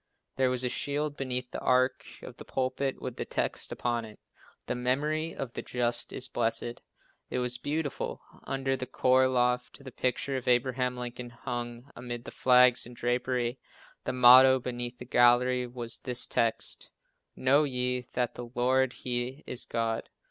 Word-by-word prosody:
There 130 -1 +2
was 125 0 0
a 125 - +1
shield 145 +3 -2
beneath 125 -2 -3
the - - -4
arch 130 +1 +1
of - - -10
the - - -9
pulpit 135 +1 -2
with 125 -2 -6
this - - -4
text - - -2
upon 120 -1 -1
it: 110 -1 -12 0.5
"The - - -2
memory 150 +6 -1
of 125 -3 -5
the - - -4
just 120 -1 -1
is 130 - +1
blessed." 120 0 -1 0.5
It - - -2
was 125 0 0
beautiful. 150 +1 -3 0.3
Under 135 0 -1
the 130 -1 -5
choir 130 0 +3
loft 125 +1 0
the 130 - -9
picture 130 +2 -1
of 130 - -7
Abraham 125 0 +1
Lincoln 120 0 -6
hung 120 +1 -6
amid 120 -1 -6
the - - -7
flags 125 -1 +5
and 125 - -12
drapery. 120 +1 -1 0.4
The 130 - -2
motto, 130 +1 +8
beneath 120 -1 -5
the 125 - -9
gallery, 125 +1 +4
was 120 -1 -4
this 125 -1 0
text: 115 -1 0 0.5
"Know 140 +3 +4
ye 125 -2 -1
that 125 -1 0
the 120 -1 -8
Lord 130 +1 +2
He 125 +2 -3
is 125 - -1
God." 115 -1 -2
125 Hz, 165 wpm, -29 LUFS, 120-130 Hz, 0.5 s, motto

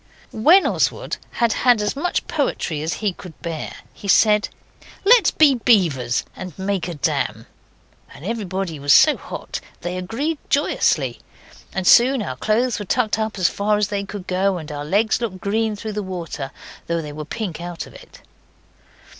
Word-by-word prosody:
When 330 - +5
Oswald - - 0
had 235 -2 +2
had 245 -3 +3
as 210 +3 -1
much 330 +6 -1
poetry 220 - -1
as 160 +2 -2
he 200 - +2
could 175 -2 -12
bear 165 -3 -4 0.2
he 200 - -10
said, 210 +2 +4 0.6
'Let's 455 -2 +7
be 300 -3 +5
beavers 170 - +2
and 185 -4 -8
make 190 -2 -2
a 175 - -5
dam.' 145 - -1 0.7
And 150 - -12
everybody 190 -7 -3
was 145 0 +4
so - - +7
hot - - -7 0.2
they 175 +1 -3
agreed 270 - -2
joyously, 290 +1 +1 0.5
and 190 -1 -3
soon 250 +3 +6
our 130 - -4
clothes 230 - 0
were 205 - -5
tucked 220 +1 +1
up 220 -1 -2
as 185 -2 +3
far 205 +2 0
as 210 -1 0
they 200 -1 -2
could 200 -2 -7
go 190 +1 +1
and 155 -2 -7
our 145 0 -5
legs 215 +8 +1
looked 200 -6 -3
green 215 +2 0
through 215 +1 -6
the 210 - -2
water, 175 -7 -5 0.4
though 170 -1 -1
they 150 -1 -7
were 155 +1 -6
pink 170 +1 -5
out 175 -1 -5
of - - -15
it. - - -15
200 Hz, 175 wpm, -21 LUFS, 175-225 Hz, 0.7 s, Let's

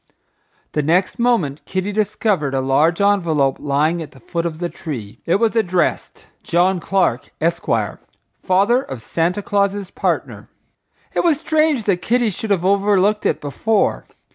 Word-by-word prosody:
The 150 - 0
next 180 - +1
moment 225 - +1
Kitty 190 +2 -2
discovered 205 -8 0
a - - +1
large 145 +6 +2
envelope 170 -9 +2
lying 150 +4 0
at 155 - -9
the 135 - -16
foot 170 +7 -3
of 160 -2 -6
the 175 +1 -2
tree. 120 -12 -7
It 170 - +3
was 225 +2 +1
addressed, 185 -5 0 0.2
John 180 -1 +1
Clark, 170 -9 0
Esq., 170 +2 -1 0.7
Father 200 +7 +2
of 135 - -7
Santa 170 - -1
Claus's 200 -1 0
Partner. - - -2 0.6
It - - +1
was 325 -4 +2
strange 310 -5 +1
that 195 -4 0
Kitty 240 0 +1
should 215 +4 -6
have 185 -3 +1
overlooked 200 +1 +2
it - - 0
before. 195 - 0
185 Hz, 150 wpm, -19 LUFS, 160-210 Hz, 0.7 s, It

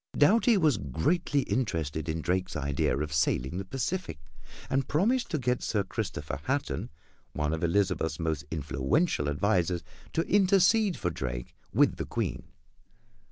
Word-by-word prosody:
Doughty 220 +8 +5
was 155 - +3
greatly 140 - 0
interested 80 - -2
in 80 +1 -2
Drake's 90 +1 -1
idea 70 -2 0
of 75 +1 -3
sailing 75 +1 +1
the - - -3
Pacific, 135 - -3 0.5
and 135 0 0
promised 230 - +1
to 160 - 0
get 125 -2 0
Sir 105 -3 0
Christopher 75 -6 -4
Hatton, 135 - -1 0.4
one 75 +1 -1
of 80 - -3
Elizabeth's 85 -2 +1
most 80 -4 -1
influential 75 - 0
advisors, 90 +2 +1 0.3
to 165 - +1
intercede 195 0 +4
for 90 -4 -1
Drake 60 -5 -5 0.2
with - - +3
the - - -3
Queen. - - -3
95 Hz, 140 wpm, -29 LUFS, -, 0.5 s, Doughty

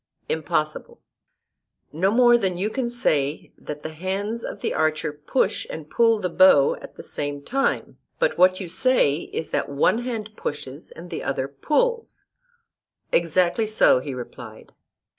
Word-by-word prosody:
Impossible. 475 0 -2 0.9
No 180 +5 +2
more 240 +2 +5
than 190 -6 0
you 205 +4 -1
can 255 -1 -2
say 150 - -1
that 150 0 -8
the 155 - -6
hands 195 +7 -3
of - - -7
the - - -1
archer 155 -1 0
push 150 - -1
and 155 -1 -8
pull 230 -2 +3
the 185 - -1
bow 170 -6 +5
at - - -12
the - - -10
same 145 -1 -3
time, 270 - -1 0.2
but - - +1
what 185 0 +4
you 190 - -5
say 185 - +3
is 160 - -4
that - - -1
one 140 +10 +2
hand 230 -4 -4
pushes 145 -2 -6
and 175 +1 -12
the - - -4
other 135 0 -2
pulls. 450 - -1 0.9
Exactly 175 +5 +2
so, 215 -11 +4
he 135 0 -6
replied. 120 -2 -10
185 Hz, 155 wpm, -23 LUFS, 150-235 Hz, 0.9 s, more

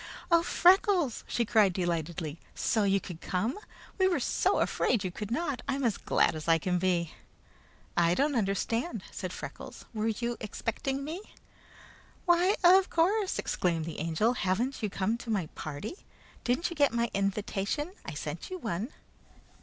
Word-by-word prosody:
"Oh 335 0 +6
Freckles!" 355 - +4
she 235 - 0
cried 210 -4 +4
delightedly. 170 -2 -2 0.2
"So 220 -3 +1
you 195 0 +3
could 175 -4 -9
come? 220 - -1 0.4
We 375 - +5
were 365 - +1
so - - +1
afraid 230 -5 +1
you 185 - -2
could 210 +3 -6
not! 280 0 -1
I'm 275 0 -1
as 230 -5 +1
glad - - +2
as 155 +1 -6
I 165 0 +6
can 180 +2 0
be!" 175 -2 0 0.8
"I 170 0 +3
don't 290 +5 +2
understand," 230 - -1
said - - -5
Freckles. - - -8
"Were 215 0 -1
you 235 +2 -1
expecting 265 +6 -3
me?" 320 +6 -5 1.0
"Why 355 +3 +4
of 370 +2 +7
course!" 385 +4 +2
exclaimed 165 -3 0
the 165 - -6
Angel. 165 +9 +1
"Haven't 240 +6 -1
you 210 - 0
come 205 +4 -1
to 240 - -9
my 200 -6 +1
party? 155 - -5 0.5
Didn't 255 +9 0
you - - -5
get 285 -3 +4
my 235 0 0
invitation? 200 - -1
I - - -6
sent - - -5
you 370 - -4
one." 225 - -3
225 Hz, 160 wpm, -30 LUFS, 185-290 Hz, 1.0 s, of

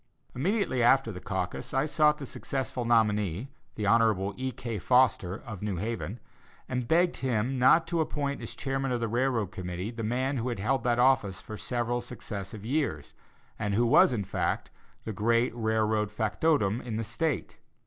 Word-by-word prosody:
Immediately 170 - 0
after 120 0 +4
the 90 - -7
caucus, 90 -1 -4
I 135 - +3
sought 150 0 +3
the 140 - -6
successful 130 -2 -4
nominee, 105 -2 +2 0.3
Hon. 105 -2 +2
E. 130 0 -3
K. 115 -2 -5
Foster, 120 -5 +3
of 100 -5 -7
New 105 -2 -2
Haven, 110 +3 -4 0.5
and 125 -2 -2
begged 175 +4 +3
him 130 0 -1
not 130 +6 +6
to 165 0 0
appoint 145 -2 -2
as - - -7
chairman 135 -1 -2
of 120 - 0
the 115 - -1
railroad 120 -3 0
committee 90 +1 -5
the 115 -1 -6
man 130 +5 0
who 120 +1 -1
had 120 - -3
held 120 +6 0
that 120 -1 +2
office 120 -7 +3
for 110 - -8
several 120 +1 -2
successive 105 -4 -7
years, 125 - -1 0.5
and 105 -2 -1
who 120 +3 +3
was, 115 - +6
in 110 -5 -1
fact, - - -2 0.3
the 110 - -3
great 115 +4 +2
railroad 110 -2 +1
factotum 110 -1 +1
in 115 -3 -5
the 115 - -1
State. 125 +4 -2
115 Hz, 170 wpm, -29 LUFS, 105-130 Hz, 0.5 s, not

